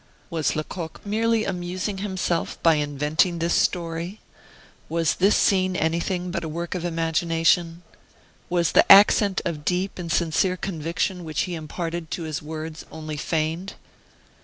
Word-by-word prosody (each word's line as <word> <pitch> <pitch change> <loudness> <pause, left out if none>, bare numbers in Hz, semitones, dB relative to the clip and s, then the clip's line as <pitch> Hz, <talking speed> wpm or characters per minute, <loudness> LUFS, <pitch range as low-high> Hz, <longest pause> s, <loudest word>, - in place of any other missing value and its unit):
Was 160 -4 0
Lecoq 160 +1 -5
merely 225 +2 +1
amusing 185 +2 -3
himself 185 -4 -2
by 165 - +6
inventing 150 +4 +1
this 170 +1 0
story? 170 +3 -1 0.7
Was 165 -2 +1
this 195 +3 +3
scene 185 -2 +2
anything 175 +2 -1
but 170 -1 -3
a 160 - -4
work 170 +2 -4
of 180 -2 -4
imagination? 165 0 +1 0.7
Was 175 -1 +1
the - - +5
accent 200 0 +7
of 155 -4 -3
deep 185 +4 -1
and 170 -2 -4
sincere 170 +3 +1
conviction 170 +1 -2
which 155 -2 -2
he 180 - -3
imparted 165 +1 -5
to 170 - -4
his 155 -2 -4
words 155 +1 -6
only 155 -1 -6
feigned? 160 +4 -2
170 Hz, 140 wpm, -24 LUFS, 160-185 Hz, 0.7 s, accent